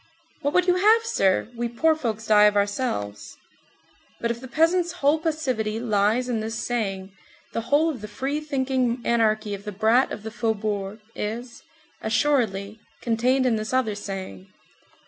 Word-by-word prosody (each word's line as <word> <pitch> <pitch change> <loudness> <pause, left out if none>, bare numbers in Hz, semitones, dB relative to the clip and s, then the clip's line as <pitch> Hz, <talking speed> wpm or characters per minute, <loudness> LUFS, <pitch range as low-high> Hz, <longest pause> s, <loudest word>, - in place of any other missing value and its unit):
"What 285 0 -1
would 360 0 +4
you 360 0 +3
have, 435 +4 +5
sir, 195 - +2
we 235 0 -2
poor 315 +7 +2
folks 225 -7 -3
die 210 -1 +6
of 210 0 +4
ourselves." 200 - -2 0.8
But 235 - 0
if 235 0 -5
the 260 - -8
peasant's 340 +5 +2
whole 305 -2 +2
passivity 255 -10 -1
lies 220 +2 +1
in 240 -3 -1
this 220 +1 -4
saying, 195 -6 -2 0.4
the 230 - -1
whole 295 +3 +4
of 285 -9 -3
the 210 - -6
free 270 +8 -3
thinking 260 -4 0
anarchy 215 -2 +1
of 200 0 -6
the 210 - -5
brat 220 +6 +3
of 210 - -6
the 220 - -6
faubourgs 215 -2 -2
is, 235 +3 -5 0.4
assuredly, 220 -5 0 0.2
contained 250 +3 +1
in 235 -3 +2
this 215 +3 -4
other 255 -5 +1
saying. 190 - -7
230 Hz, 165 wpm, -24 LUFS, 210-270 Hz, 0.8 s, die